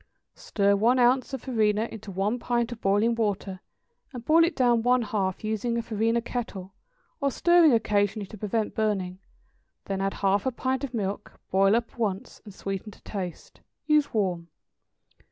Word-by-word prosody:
= -, -, -54 dB
Stir 200 Hz, -1 st, +1 dB
one 235 Hz, +5 st, +3 dB
ounce 255 Hz, +2 st, +3 dB
of 270 Hz, -, -5 dB
farina 220 Hz, -3 st, +1 dB
into 220 Hz, -2 st, -9 dB
one 200 Hz, +5 st, -1 dB
pint 240 Hz, 0 st, -1 dB
of 230 Hz, -2 st, -8 dB
boiling 205 Hz, +4 st, +2 dB
water, 205 Hz, -4 st, -2 dB, 0.5 s
and 245 Hz, -3 st, -8 dB
boil 325 Hz, +2 st, +5 dB
it 335 Hz, +1 st, +1 dB
down 240 Hz, -3 st, +3 dB
one 250 Hz, +1 st, +3 dB
half, 200 Hz, -5 st, -2 dB
using 220 Hz, +2 st, -1 dB
a 235 Hz, -, -1 dB
farina 225 Hz, +1 st, 0 dB
kettle, 200 Hz, -6 st, -5 dB, 0.5 s
or 280 Hz, -3 st, +1 dB
stirring 345 Hz, +2 st, +5 dB
occasionally 210 Hz, -2 st, +1 dB
to 215 Hz, -, -11 dB
prevent 215 Hz, +1 st, -1 dB
burning, 195 Hz, -4 st, -1 dB, 0.7 s
then 195 Hz, -1 st, -3 dB
add 195 Hz, 0 st, -1 dB
half 200 Hz, +4 st, +1 dB
a -, -, +1 dB
pint 260 Hz, +2 st, -2 dB
of 260 Hz, -3 st, -4 dB
milk, 200 Hz, -2 st, -4 dB
boil 195 Hz, +2 st, +4 dB
up 235 Hz, 0 st, -3 dB
once, 200 Hz, -3 st, -3 dB
and 210 Hz, -, -11 dB
sweeten 195 Hz, +2 st, -5 dB
to -, -, -18 dB
taste. 185 Hz, -4 st, -7 dB, 0.2 s
Use 300 Hz, -1 st, +3 dB
warm. 180 Hz, -6 st, -1 dB
220 Hz, 170 wpm, -26 LUFS, 200-245 Hz, 0.7 s, boil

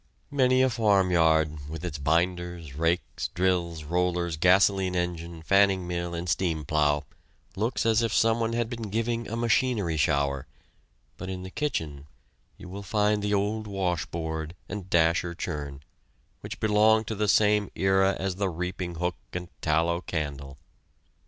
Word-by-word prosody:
Many 130 Hz, -2 st, +3 dB
a 130 Hz, -, +3 dB
farmyard, 80 Hz, -9 st, +2 dB
with 80 Hz, +2 st, -6 dB
its 75 Hz, -4 st, -4 dB
binders, 85 Hz, 0 st, -1 dB
rakes, 80 Hz, +4 st, -1 dB
drills, 85 Hz, -3 st, -1 dB
rollers, 85 Hz, +1 st, 0 dB
gasoline 95 Hz, +2 st, +3 dB
engine, 85 Hz, -2 st, -3 dB
fanning 95 Hz, 0 st, +3 dB
mill, 85 Hz, 0 st, -3 dB
and 85 Hz, +1 st, -4 dB
steam 80 Hz, -3 st, 0 dB
plow 75 Hz, -1 st, +1 dB, 0.5 s
looks 115 Hz, +5 st, -1 dB
as 115 Hz, 0 st, +3 dB
if 115 Hz, -2 st, 0 dB
someone 115 Hz, +1 st, +2 dB
had 120 Hz, -1 st, 0 dB
been 115 Hz, -3 st, -6 dB
giving 115 Hz, +2 st, -1 dB
a 115 Hz, -, -4 dB
machinery 115 Hz, -, +1 dB
shower; 70 Hz, -2 st, +1 dB, 0.7 s
but 95 Hz, -, -6 dB
in 90 Hz, -1 st, -5 dB
the 95 Hz, -, -8 dB
kitchen 80 Hz, -, -3 dB, 0.5 s
you -, -, -11 dB
will 95 Hz, +3 st, -7 dB
find 105 Hz, +1 st, +1 dB
the 105 Hz, 0 st, +1 dB
old 105 Hz, +2 st, -1 dB
washboard 85 Hz, -4 st, -3 dB
and 100 Hz, -3 st, -6 dB
dasher 85 Hz, 0 st, +2 dB
churn, 75 Hz, -5 st, -5 dB, 0.6 s
which -, -, -8 dB
belonged 110 Hz, +1 st, +4 dB
to 110 Hz, -, -3 dB
the 105 Hz, 0 st, -1 dB
same 105 Hz, 0 st, +3 dB
era 95 Hz, +1 st, +3 dB
as 95 Hz, -1 st, -2 dB
the 100 Hz, -1 st, 0 dB
reaping 90 Hz, +1 st, -4 dB
hook 90 Hz, -2 st, -2 dB, 0.2 s
and 90 Hz, -1 st, -5 dB
tallow 85 Hz, +2 st, +1 dB
candle. 70 Hz, -5 st, -4 dB
90 Hz, 145 wpm, -27 LUFS, 80-105 Hz, 0.7 s, belonged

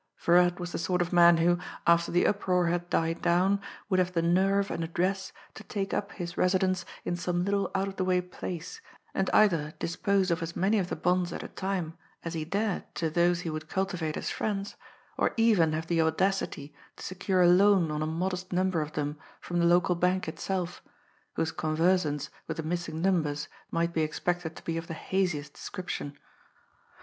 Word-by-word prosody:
Viral 175 Hz, 0 st, +4 dB
was 175 Hz, -1 st, -5 dB
the -, -, -3 dB
sort 180 Hz, +2 st, 0 dB
of 175 Hz, +1 st, -1 dB
man 170 Hz, -1 st, +7 dB
who, 175 Hz, +1 st, +3 dB, 0.3 s
after 170 Hz, 0 st, +4 dB
the 175 Hz, -, +3 dB
uproar 180 Hz, -3 st, +2 dB
had 175 Hz, +1 st, -1 dB
died 165 Hz, 0 st, 0 dB
down, 185 Hz, +3 st, +2 dB, 0.3 s
would 185 Hz, -2 st, +2 dB
have 180 Hz, 0 st, +1 dB
the 165 Hz, -1 st, +1 dB
nerve 195 Hz, +3 st, +2 dB
and 165 Hz, -, -2 dB
address 185 Hz, +4 st, -1 dB, 0.2 s
to 220 Hz, -, -10 dB
take 195 Hz, -1 st, -3 dB
up 200 Hz, -, -2 dB
his 175 Hz, -2 st, -6 dB
residence 185 Hz, -1 st, +2 dB, 0.2 s
in 175 Hz, -, -1 dB
some 175 Hz, 0 st, -1 dB
little 200 Hz, 0 st, 0 dB
out 195 Hz, +1 st, +1 dB
of 195 Hz, -, -7 dB
the 185 Hz, -, 0 dB
way 185 Hz, -1 st, +2 dB
place, 180 Hz, -, -6 dB, 0.3 s
and -, -, 0 dB
either 165 Hz, -8 st, +3 dB
dispose 190 Hz, +2 st, 0 dB
of 170 Hz, +1 st, 0 dB
as 165 Hz, +1 st, -4 dB
many 205 Hz, +4 st, +2 dB
of 180 Hz, -2 st, -2 dB
the -, -, -2 dB
bonds 180 Hz, 0 st, +1 dB
at -, -, -5 dB
a -, -, -6 dB
time 185 Hz, -4 st, -3 dB, 0.2 s
as 165 Hz, -, -4 dB
he 160 Hz, -2 st, -2 dB
dared 200 Hz, +4 st, -1 dB
to 160 Hz, -2 st, -1 dB
those 175 Hz, +1 st, +2 dB
he 170 Hz, -, -4 dB
would 155 Hz, 0 st, -6 dB
cultivate 180 Hz, -5 st, -2 dB
as -, -, -3 dB
friends, 200 Hz, -2 st, -3 dB, 0.4 s
or -, -, +1 dB
even 215 Hz, -9 st, +4 dB
have 160 Hz, +1 st, -2 dB
the 165 Hz, 0 st, +1 dB
audacity 160 Hz, -3 st, 0 dB, 0.2 s
to -, -, -11 dB
secure 185 Hz, 0 st, +1 dB
a -, -, +6 dB
loan 185 Hz, -2 st, +5 dB
on 150 Hz, 0 st, -2 dB
a 155 Hz, -, 0 dB
modest 180 Hz, +3 st, -3 dB
number 185 Hz, -2 st, +1 dB
of 150 Hz, 0 st, -5 dB
them 150 Hz, 0 st, -3 dB, 0.2 s
from 175 Hz, 0 st, -3 dB
the 170 Hz, -, +3 dB
local 175 Hz, +1 st, +4 dB
bank 180 Hz, +1 st, +1 dB
itself, 175 Hz, +2 st, -3 dB, 0.5 s
whose 160 Hz, -, 0 dB
conversance 155 Hz, -1 st, +1 dB, 0.2 s
with 160 Hz, -, -4 dB
the 160 Hz, -, -3 dB
missing 165 Hz, 0 st, -3 dB
numbers 155 Hz, -6 st, +1 dB, 0.2 s
might 170 Hz, 0 st, 0 dB
be 160 Hz, -, +1 dB
expected 160 Hz, +1 st, -2 dB
to -, -, -11 dB
be 165 Hz, 0 st, -2 dB
of 165 Hz, 0 st, -5 dB
the 165 Hz, -, -5 dB
haziest 160 Hz, -6 st, -1 dB
description. 175 Hz, -6 st, -6 dB
175 Hz, 200 wpm, -29 LUFS, 165-190 Hz, 0.5 s, man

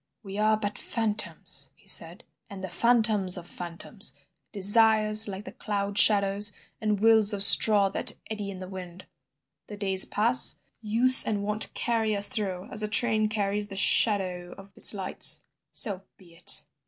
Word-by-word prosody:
"We 195 Hz, 0 st, -10 dB
are 215 Hz, 0 st, 0 dB
but 205 Hz, -1 st, -7 dB
phantoms!" 220 Hz, -2 st, -1 dB
he -, -, -31 dB
said, -, -, +1 dB, 0.3 s
"and 195 Hz, -2 st, -12 dB
the 190 Hz, -, -8 dB
phantoms 215 Hz, -2 st, 0 dB
of 175 Hz, -, -11 dB
phantoms, 175 Hz, -1 st, -6 dB, 0.4 s
desires 215 Hz, +1 st, +4 dB
like 200 Hz, +1 st, -11 dB
cloud 200 Hz, -1 st, -6 dB
shadows 205 Hz, 0 st, +3 dB, 0.3 s
and 210 Hz, -2 st, -3 dB
wills 220 Hz, -1 st, +3 dB
of 200 Hz, -1 st, -1 dB
straw 205 Hz, -1 st, +5 dB
that -, -, -1 dB
eddy 210 Hz, -2 st, -8 dB
in 195 Hz, -, -10 dB
the 185 Hz, 0 st, -11 dB
wind; 185 Hz, -1 st, -13 dB, 0.6 s
the 210 Hz, -, -12 dB
days 195 Hz, -2 st, +4 dB
pass, 235 Hz, +5 st, +4 dB, 0.3 s
use 235 Hz, +4 st, +4 dB
and 205 Hz, -2 st, -5 dB
wont 210 Hz, +1 st, -5 dB
carry 225 Hz, -3 st, -3 dB
us 200 Hz, 0 st, +3 dB
through 190 Hz, -4 st, -4 dB
as -, -, 0 dB
a 215 Hz, -, -4 dB
train 215 Hz, 0 st, 0 dB
carries 205 Hz, -1 st, -4 dB
the 195 Hz, -1 st, -11 dB
shadow 185 Hz, -4 st, 0 dB
of 195 Hz, 0 st, -17 dB
its -, -, +2 dB
lights—so 195 Hz, +1 st, -3 dB, 0.2 s
be 175 Hz, -3 st, -22 dB
it! 170 Hz, -, -5 dB
205 Hz, 155 wpm, -24 LUFS, 195-215 Hz, 0.6 s, straw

